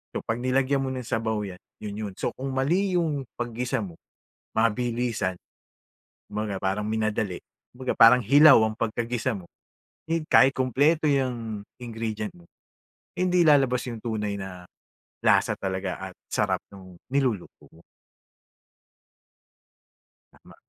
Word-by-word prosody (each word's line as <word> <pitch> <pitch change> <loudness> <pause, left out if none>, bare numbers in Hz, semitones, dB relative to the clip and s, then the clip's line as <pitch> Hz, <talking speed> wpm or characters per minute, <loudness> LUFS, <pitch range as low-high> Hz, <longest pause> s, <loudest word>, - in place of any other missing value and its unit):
So - - -3
'pag 115 +1 -1
nilagyan 135 +2 +2
mo 130 - -2
ng 125 -2 -5
sabaw 110 -1 -1
'yan, 90 0 -10 0.2
'yon 105 -1 -5
'yon. 105 -2 -5
So - - -1
kung 135 +1 -4
mali 180 +7 +1
'yong 150 -5 -1 0.2
paggisa 120 +2 -2
mo, 85 - -10 0.6
mabilisan, 115 -3 0 0.9
kumbaga 105 -1 -3
parang 100 +2 -1
minadali. 110 -3 -1 0.3
Kumbaga 130 +1 -3
parang 120 +2 +8
hilaw 145 +6 +8
ang 110 - -5
pagkagisa 115 +1 -1
mo, 90 -3 -12 0.6
hin 165 -1 0
kahit 135 - +6
kumpleto 145 +5 +2
'yang 120 -6 -1 0.2
ingredient 110 -2 -4
mo, 85 -1 -18 0.7
hindi 180 -1 +3
lalabas 135 -4 +4
'yong 115 -3 -6
tunay 105 -3 -2
na 90 -2 -8 0.6
lasa - - +4
talaga 95 -1 -3
at - - -20 0.2
sarap - - +1
no'ng 95 -2 -13 0.2
niluluto 125 -10 -1
mo. 85 - -18 2.5
Tama. - - -18
115 Hz, 130 wpm, -26 LUFS, 105-130 Hz, 2.5 s, parang